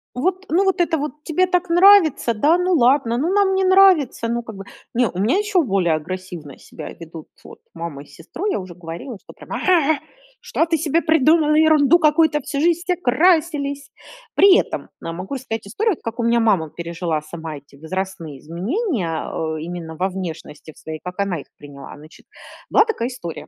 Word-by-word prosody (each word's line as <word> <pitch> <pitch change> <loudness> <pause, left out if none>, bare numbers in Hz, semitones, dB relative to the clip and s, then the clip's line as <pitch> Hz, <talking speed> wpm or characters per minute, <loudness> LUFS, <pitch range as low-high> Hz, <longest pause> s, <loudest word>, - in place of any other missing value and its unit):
"Вот, 370 +8 -1
ну 350 +5 +2
вот 385 0 +1
это 335 -2 +1
вот 300 +1 -6
тебе 365 +3 +1
так 360 0 0
нравится, 350 - +5
да? 295 +11 +3
Ну 360 +1 0
ладно, 250 -4 +3
ну 325 +8 0
нам 395 -2 +2
не 385 - +1
нравится, 370 -11 +4
ну 235 0 -2
как 220 -3 -9
бы". 195 - -9 0.3
Не, 245 0 +2
у 180 - -8
меня 225 - +2
ещё 410 -4 +1
более 190 - +1
агрессивно 170 -3 -7
себя - - -10
ведут 165 -1 -11 0.2
вот - - -13
мама 165 -4 -7
и - - -20
сестру, 310 - -9
я 405 - 0
уже 185 -2 -9
говорила- 175 +7 -8
что - - -14
они - - -13
прямо: - - -4
"А! 320 -4 +4
А! - - -10 0.5
Что 325 - 0
ты 325 -1 0
себе 320 +2 0
придумала? 315 -1 +3
Ерунду 315 0 +5
какую-то! 305 -1 +3
Всю 280 +1 -4
жизнь 340 +2 +2
все 360 +1 0
красились!" 290 -2 +1 0.5
При 390 -1 +7
этом - - -3
могу 180 +7 -6
рассказать 230 -5 -5
историю, 415 - 0
от - - -12
как 230 0 -6
у 235 - 0
меня 235 0 +2
мама 195 -9 +1
пережила 170 -1 -4
сама 160 0 -8
эти 140 0 -18
возрастные 165 -1 -5
изменения, 185 - -3 0.3
э, 155 - -7
именно 165 -1 -7
во 185 +4 -1
внешности 165 -4 -8
в - - -25
своей, 155 -1 -7
как 180 +1 -8
она 195 -4 -1
их - - -12
приняла. 140 -1 -11
Значит 155 +2 -16 0.4
была 430 - +5
такая 435 - -2
история. 245 -10 -8
245 Hz, 195 wpm, -20 LUFS, -, 0.5 s, При